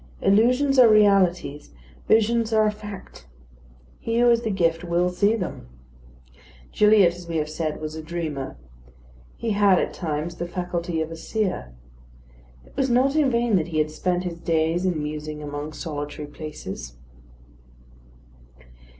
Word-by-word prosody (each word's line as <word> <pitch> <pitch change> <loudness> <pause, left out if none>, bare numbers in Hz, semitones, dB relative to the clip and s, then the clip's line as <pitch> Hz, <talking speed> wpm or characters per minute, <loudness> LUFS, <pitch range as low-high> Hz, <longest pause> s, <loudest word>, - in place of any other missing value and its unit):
Illusions 250 +7 +3
or 240 -3 +8
realities, 195 -8 +3 0.4
visions 225 +1 +3
are 220 -1 +4
a 210 - +2
fact. 205 - -10 0.7
He 230 0 -2
who 240 0 +5
has 235 -1 +4
the 225 - -2
gift 170 -4 0
will 175 +1 +1
see 200 +5 +2
them. 180 - -5 1.0
Gilliatt, 210 -4 +5
as 175 0 -11
we 165 -1 -2
have 150 -1 -1
said, 155 0 -3
was 155 0 -5
a 160 - -6
dreamer. 155 -4 -5 0.8
He 230 - -2
had, 200 -2 +4
at - - -1
times, 165 0 -4
the 175 - -4
faculty 175 -2 -3
of 160 +1 -4
a - - -5
seer. 180 - -3 0.9
It - - -21
was 270 -1 0
not 260 +4 +3
in 300 -3 +3
vain 235 -4 +2
that 165 - -1
he 165 -2 -4
had 155 0 +1
spent 180 +3 -1
his 170 -2 -5
days 165 +2 0
in 160 -5 -1
musing 150 0 -5
among 145 +1 -5
solitary 150 -1 -6
places. 145 - -8
175 Hz, 150 wpm, -24 LUFS, 155-215 Hz, 1.0 s, or